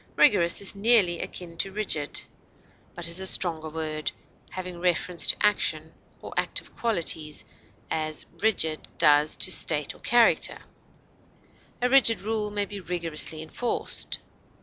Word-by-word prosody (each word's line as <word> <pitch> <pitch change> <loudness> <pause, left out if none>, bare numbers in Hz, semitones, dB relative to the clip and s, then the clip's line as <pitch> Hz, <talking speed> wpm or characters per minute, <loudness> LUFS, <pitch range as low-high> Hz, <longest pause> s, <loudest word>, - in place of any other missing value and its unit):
Rigorous 180 -11 +4
is 200 - +2
nearly 200 -5 +4
akin 170 -2 -6
to 195 - -2
rigid, 190 -8 -2 0.7
but 175 -1 +1
is 170 +2 +1
a 190 - 0
stronger 160 -4 0
word, 155 -1 -3 0.4
having 180 -2 -7
reference 175 0 +1
to - - +5
action 160 -6 0 0.3
or - - -8
active - - -2
qualities, 160 -9 -1 0.5
as 155 -1 -2
rigid 160 -8 +1
does 150 0 +4
to 185 - +2
state 150 -5 +3
or - - -19
character; 240 -1 +3 1.3
a - - +4
rigid 250 -3 +4
rule 215 0 -2
may 205 0 -1
be 200 0 -8
rigorously 165 -3 -3
enforced. 240 +9 -2
175 Hz, 130 wpm, -26 LUFS, 160-205 Hz, 1.3 s, to